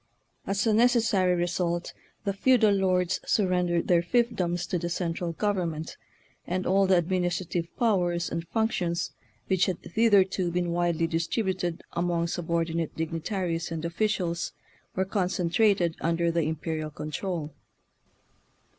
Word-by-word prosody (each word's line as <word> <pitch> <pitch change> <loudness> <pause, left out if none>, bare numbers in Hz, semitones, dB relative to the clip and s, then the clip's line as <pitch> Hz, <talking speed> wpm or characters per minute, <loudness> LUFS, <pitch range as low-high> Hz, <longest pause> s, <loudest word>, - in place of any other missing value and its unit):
As 195 0 0
a 220 - +3
necessary 220 -6 +3
result, 175 0 -1 0.3
the 200 - 0
feudal 220 0 +4
lords 185 -2 +1
surren 180 -3 +1
dered 170 -1 +1
their 175 -2 +4
fiefdoms 180 -4 0
to 180 - 0
the 170 +1 -3
central 170 -1 -2
gov 205 +4 0
ernment, 165 -3 -3 0.5
and 185 +1 -1
all 195 +1 +3
the 185 -1 +5
administrative 175 -1 -1
pow 220 -6 +3
ers 175 0 -1
and 165 0 -3
functions 180 -5 -1 0.3
which 190 -1 +2
had 185 -3 -1
thitherto 190 -3 +3
been 175 0 -1
widely 170 -1 +1
distributed 175 +1 -1
among 170 -1 0
subordi 170 -1 -1
nate 165 -2 -2
dignitaries 165 +1 -2
and 165 0 -3
officials 175 -1 -1 0.4
were 190 - +1
con 190 -1 0
centrated 180 0 +2
under 170 0 +1
the 170 0 +1
imperial 155 0 -3
control. 155 +1 -4
175 Hz, 135 wpm, -27 LUFS, 170-190 Hz, 0.5 s, the